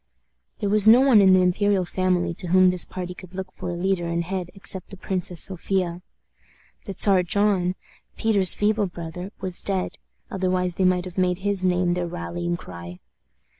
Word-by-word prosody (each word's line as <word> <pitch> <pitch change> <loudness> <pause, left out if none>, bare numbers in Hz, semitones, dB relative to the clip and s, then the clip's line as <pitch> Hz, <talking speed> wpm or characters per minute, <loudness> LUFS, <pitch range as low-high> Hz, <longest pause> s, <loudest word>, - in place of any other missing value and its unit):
There 205 - -2
was 210 0 +5
no 230 +3 +8
one 260 -6 +6
in 190 -1 +6
the 185 0 +5
imperial 190 +1 +1
family 180 -1 0
to 175 - -6
whom 185 +1 +5
this 180 -2 +3
party 180 -1 -6
could 185 0 -13
look 190 0 -6
for - - -7
a 175 - -3
leader 175 -1 -1
and 170 0 -1
head 180 0 -4
except 190 -1 -2
the 195 - -11
Princess 180 -2 -1
Sophia. 180 -1 -2 0.8
The 200 - -5
Czar 195 -3 +5
John, 185 0 +1 0.4
Peter's 200 -5 +2
feeble 210 0 +1
brother, 175 +2 -8
was 185 -2 -3
dead, 190 -2 -3 0.3
otherwise 185 -1 -1
they 185 +2 0
might 180 0 +2
have 185 +1 -6
made 180 -1 +1
his 200 -2 0
name 180 -1 +1
their 175 0 -2
rallying 85 - -4
cry. 85 0 -10
185 Hz, 180 wpm, -23 LUFS, 175-195 Hz, 0.8 s, no